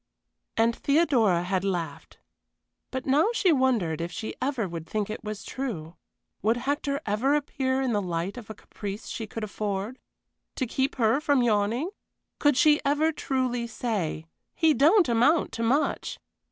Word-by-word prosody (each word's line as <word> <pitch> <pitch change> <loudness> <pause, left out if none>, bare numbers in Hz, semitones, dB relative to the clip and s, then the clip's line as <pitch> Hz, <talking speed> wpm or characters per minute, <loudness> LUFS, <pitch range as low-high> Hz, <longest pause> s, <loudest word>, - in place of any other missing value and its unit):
And 230 +1 +3
Theodora 255 - +3
had 185 +1 -1
laughed, 180 -4 -4 0.7
but 260 0 -4
now 285 +7 +4
she 380 -5 +3
wondered 230 - +1
if 170 +1 -3 0.3
ever 265 -4 0
she - - 0
would 165 -3 -6
think 215 +2 -2
it 215 - -6
was 215 -1 -5
true. 180 -12 -5 0.5
Would 225 +3 +2
Hector 280 +2 -1
ever 230 +8 +2
appear 265 -2 -1
in 250 -3 0
the 205 - +1
light 175 +1 -3
of 235 -4 -10
a 220 - -6
caprice 205 +1 -7
she 225 - -5
could 225 +1 -6
afford, 210 +3 -3 0.6
to 260 - -1
keep 265 +3 -1
her 230 +3 +2
from 285 -4 +3
yawning? 230 - +1 0.5
Could 290 -3 +3
she 300 -2 +5
ever 295 +3 +2
truly 255 -5 -1
say, 205 -9 -3 0.3
"He 320 -1 +4
don't 320 - +5
amount 250 +8 +3
to 230 - -5
much!" 270 +7 0
235 Hz, 160 wpm, -27 LUFS, 205-280 Hz, 0.7 s, she